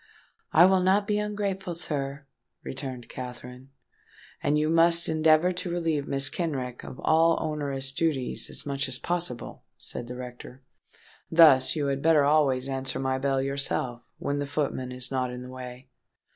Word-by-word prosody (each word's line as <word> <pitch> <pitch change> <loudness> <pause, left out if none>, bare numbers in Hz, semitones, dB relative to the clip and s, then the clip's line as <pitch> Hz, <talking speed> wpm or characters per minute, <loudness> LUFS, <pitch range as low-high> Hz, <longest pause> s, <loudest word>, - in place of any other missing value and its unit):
"I 170 +3 +7
will 190 0 +4
not 190 +3 +3
be 210 0 0
ungrateful, 200 -4 -3
sir," 140 -3 -3 0.4
returned 130 -3 -6
Katherine. 125 +1 -9 0.7
"And 150 - +2
you 150 0 +1
must 165 +1 +4
endeavour 160 +2 +4
to 180 +1 -4
relieve 165 -4 -1
Mrs. 135 -1 0
Kenrick 130 -8 -3
of 130 - -9
all 165 +1 +4
onerous 140 -3 -2
duties 140 -3 -1
as - - -6
much 140 -1 -1
as 130 -1 0
possible," 170 -8 -4
said 120 - -5
the 125 - -6
rector. 125 +1 -9 0.7
"Thus, 160 -6 +6
you 150 -2 -1
had 140 -1 -1
better 160 -2 +5
always 140 -3 +3
answer 135 -1 -3
my 130 0 -1
bell 135 0 +1
yourself, 135 -3 -2 0.2
when 145 0 -2
the 145 - -2
footman 135 -3 -2
is 125 +1 -4
not 130 -1 0
in 125 0 -7
the 125 - -9
way." 130 0 -9
140 Hz, 160 wpm, -27 LUFS, 130-165 Hz, 0.7 s, I